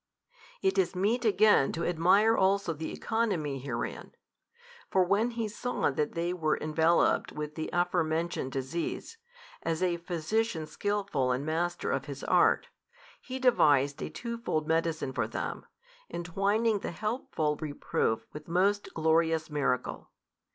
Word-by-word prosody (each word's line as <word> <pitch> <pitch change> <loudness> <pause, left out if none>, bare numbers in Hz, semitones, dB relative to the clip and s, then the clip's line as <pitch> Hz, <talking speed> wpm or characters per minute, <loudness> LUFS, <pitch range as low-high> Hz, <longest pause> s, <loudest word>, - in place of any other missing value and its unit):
It 385 0 +2
is 375 - +1
meet 220 +6 +1
again 210 -8 +5
to 170 - -2
admire 185 +6 +4
also 190 -3 +2
the 160 +1 -5
economy 190 - -1
herein. 125 -3 -5 0.8
For 190 - +4
when 200 +6 +2
He 230 -2 -3
saw 245 -3 -1
that 150 +2 -1
they 170 +1 -1
were 155 -4 0
enveloped 160 +2 +2
with 150 0 -5
the 155 0 -4
afore 175 0 +2
mentioned 160 -3 -2
disease, 160 - -4 0.4
as 165 +2 -1
a 175 -2 +1
Physician 170 +2 -1
skilful 195 -9 -1
and 130 +3 -1
master 175 +3 -1
of 135 0 -1
his 140 -1 -7
art, - - +3 0.5
He 260 - -6
devised 145 - +3
a - - -3
twofold 235 -10 -3
medicine 160 -4 0
for 115 -4 -1
them, - - -5 0.4
entwining 200 +6 +1
the - - -4
helpful 210 - -1
reproof 145 -6 -1
with 150 0 -9
most 195 +4 +1
glorious 160 0 +2
miracle. 135 -4 -1
170 Hz, 135 wpm, -30 LUFS, 150-205 Hz, 0.8 s, again